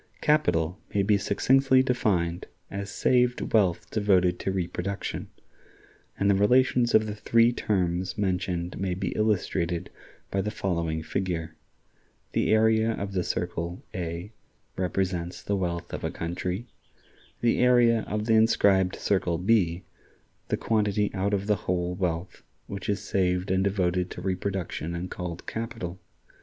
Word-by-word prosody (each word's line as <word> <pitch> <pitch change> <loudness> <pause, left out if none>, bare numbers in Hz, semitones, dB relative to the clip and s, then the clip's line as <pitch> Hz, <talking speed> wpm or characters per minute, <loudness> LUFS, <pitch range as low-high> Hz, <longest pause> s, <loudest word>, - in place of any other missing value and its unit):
Capital 90 - +2 0.2
may 100 - +3
be 105 +1 +3
succinctly 130 +6 +3
defined 95 -10 0 0.2
as 100 0 -4
saved 125 +4 +1
wealth 90 -5 +2
devoted 95 -4 +2
to 95 - -1
reproduction, 95 +1 -3 0.9
and 100 - +1
the 100 - +5
relations 120 +4 +3
of 110 0 +5
the 105 - -4
three 115 +3 +3
terms 95 -5 -1
mentioned 90 -3 -1
may 95 -2 -1
be 95 -1 -2
illustrated 90 -5 0 0.4
by 100 - +1
the 105 - -2
following 85 -6 -2
figure: 85 -3 -3 0.8
The - - +1
area 110 +1 +4
of 100 -2 -5
the 90 -2 0
circle, 85 0 -3
A, 85 +2 -4 0.4
represents 90 -1 -2
the 100 - 0
wealth 85 -3 -3
of - - -5
a - - 0
country; 90 +5 -3 0.8
the 120 - +2
area 120 -2 +4
of 105 0 -2
the 115 - +2
inscribed 100 -4 +4
circle, 90 -4 0
B, 90 -2 +2 0.6
the - - 0
quantity 105 -2 +1
out 100 +2 0
of 100 0 -3
the 105 0 +3
whole 90 -1 0
wealth 90 -1 -3 0.2
which 100 0 -6
is 100 0 -1
saved 90 0 0
and 95 0 +2
devoted 90 -2 0
to - - -7
reproduction 95 -2 -3
and 90 +2 -5
called 90 -1 -6
capital. 95 -6 -5
95 Hz, 140 wpm, -27 LUFS, 90-105 Hz, 0.9 s, the